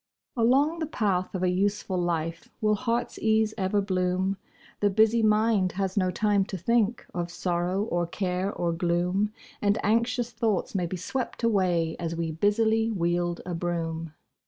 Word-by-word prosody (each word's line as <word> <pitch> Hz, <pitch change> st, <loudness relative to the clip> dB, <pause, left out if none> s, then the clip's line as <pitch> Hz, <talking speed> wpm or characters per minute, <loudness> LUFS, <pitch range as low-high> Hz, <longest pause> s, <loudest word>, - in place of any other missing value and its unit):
Along 270 Hz, +8 st, +3 dB
the 315 Hz, -, -2 dB
path 195 Hz, -, -1 dB
of 185 Hz, -, -2 dB
a 180 Hz, -, +3 dB
useful 195 Hz, +1 st, 0 dB
life 165 Hz, -1 st, -2 dB
Will 215 Hz, -1 st, +2 dB
heart's 235 Hz, +2 st, -1 dB
ease 220 Hz, 0 st, +2 dB
ever 200 Hz, 0 st, +1 dB
bloom; 185 Hz, 0 st, 0 dB, 0.4 s
The 205 Hz, -, +3 dB
busy 220 Hz, +3 st, +4 dB
mind 215 Hz, -3 st, +3 dB
has 190 Hz, -1 st, -2 dB
no 185 Hz, -3 st, +2 dB
time 205 Hz, +1 st, +2 dB
to 190 Hz, -, -5 dB
think 230 Hz, +4 st, +1 dB
Of 175 Hz, -1 st, -2 dB
sorrow, 175 Hz, +2 st, -1 dB
or 175 Hz, -5 st, -1 dB
care, 185 Hz, +1 st, -2 dB
or 170 Hz, -3 st, -1 dB
gloom; 180 Hz, +4 st, 0 dB, 0.3 s
And 205 Hz, +1 st, +2 dB
anxious 235 Hz, +2 st, +1 dB
thoughts 220 Hz, -5 st, -1 dB
may 180 Hz, -3 st, 0 dB
be 185 Hz, -, -4 dB
swept 245 Hz, +7 st, -4 dB
away 180 Hz, -7 st, +2 dB
As 165 Hz, -1 st, -3 dB
we 165 Hz, -1 st, -2 dB
busily 220 Hz, +6 st, +2 dB
wield 175 Hz, -3 st, 0 dB
a 180 Hz, -, -4 dB
broom. 165 Hz, -2 st, -3 dB
195 Hz, 160 wpm, -27 LUFS, 175-220 Hz, 0.4 s, busy